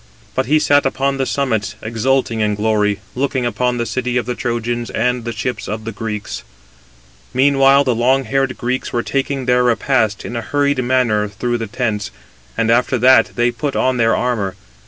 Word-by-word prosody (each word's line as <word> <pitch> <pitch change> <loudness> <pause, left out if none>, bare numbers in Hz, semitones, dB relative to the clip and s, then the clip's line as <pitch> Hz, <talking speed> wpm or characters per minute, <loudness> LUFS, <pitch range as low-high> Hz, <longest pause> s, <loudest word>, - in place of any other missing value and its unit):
But 130 -1 -1
he 155 +3 +4
sat 145 -1 +3
upon 135 +1 0
the 135 -1 -1
summits, 110 -7 -1
exulting 115 +1 0
in 105 -1 +1
glory, 105 -2 +1
looking 130 -1 -1
upon 120 +2 0
the 120 - -1
city 125 0 -2
of 120 - -1
the 125 - -2
Trojans 120 -1 -2
and 125 +1 -1
the 120 - -2
ships 125 +2 -4
of 110 +2 -4
the 115 - -5
Greeks. 105 -1 -5 0.9
Meanwhile 135 +1 +5
the 130 -3 +1
long 130 +4 +2
haired 135 +2 -1
Greeks 125 +1 -2
were 120 - -1
taking 135 -1 -2
their 125 0 +3
repast 115 -3 +1
in 120 - -5
a 115 - -2
hurried 140 +1 0
manner 120 -4 +1
through 120 +4 -2
the 115 - -4
tents, 105 -2 -2 0.5
and 115 0 +2
after 125 +2 +2
that 130 +2 +5
they 120 0 +2
put 135 +4 -3
on 130 -1 +1
their 115 -1 +3
armour. 105 -7 -1
120 Hz, 185 wpm, -18 LUFS, 115-130 Hz, 0.9 s, Meanwhile